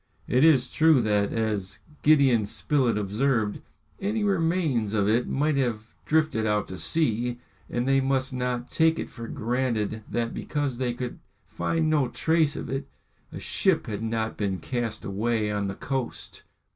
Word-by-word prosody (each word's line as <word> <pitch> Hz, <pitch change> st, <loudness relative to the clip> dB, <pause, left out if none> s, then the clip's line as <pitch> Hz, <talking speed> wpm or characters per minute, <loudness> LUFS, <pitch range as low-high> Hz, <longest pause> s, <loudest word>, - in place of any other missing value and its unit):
It 130 Hz, +3 st, +3 dB
is 140 Hz, -6 st, +5 dB
true 160 Hz, -3 st, +5 dB
that, 105 Hz, -1 st, +1 dB
as 105 Hz, -4 st, -2 dB, 0.2 s
Gideon 135 Hz, -8 st, +4 dB
Spilett 125 Hz, -1 st, +1 dB
observed, 105 Hz, +1 st, 0 dB, 0.4 s
any 210 Hz, +2 st, -1 dB
remains 165 Hz, -, +1 dB
of 100 Hz, -2 st, +2 dB
it 115 Hz, +3 st, +2 dB
might 145 Hz, +1 st, +1 dB
have 115 Hz, -4 st, -2 dB
drifted 155 Hz, -8 st, +2 dB
out 105 Hz, -1 st, +1 dB
to 95 Hz, -1 st, -6 dB
sea, 120 Hz, -, 0 dB, 0.3 s
and 120 Hz, +1 st, -1 dB
they 135 Hz, 0 st, +4 dB
must 135 Hz, 0 st, 0 dB
not 125 Hz, -1 st, -2 dB
take 160 Hz, 0 st, +3 dB
it -, -, -5 dB
for 115 Hz, 0 st, -8 dB
granted 115 Hz, -3 st, -1 dB
that 115 Hz, -1 st, -1 dB
because 145 Hz, -5 st, -2 dB
they 125 Hz, -2 st, -1 dB
could 125 Hz, 0 st, -5 dB, 0.3 s
find 160 Hz, -, -1 dB
no 150 Hz, -4 st, +2 dB
traces 160 Hz, 0 st, +1 dB
of -, -, -8 dB
it, 135 Hz, 0 st, -3 dB, 0.4 s
a -, -, -7 dB
ship -, -, +1 dB
had 105 Hz, -1 st, -4 dB
not 110 Hz, 0 st, -2 dB
been 100 Hz, -3 st, -1 dB
cast 120 Hz, 0 st, -3 dB
away 105 Hz, +2 st, 0 dB
on 100 Hz, -1 st, -1 dB
the 95 Hz, -, -4 dB
coast. 130 Hz, 0 st, -4 dB
120 Hz, 160 wpm, -26 LUFS, 110-140 Hz, 0.4 s, is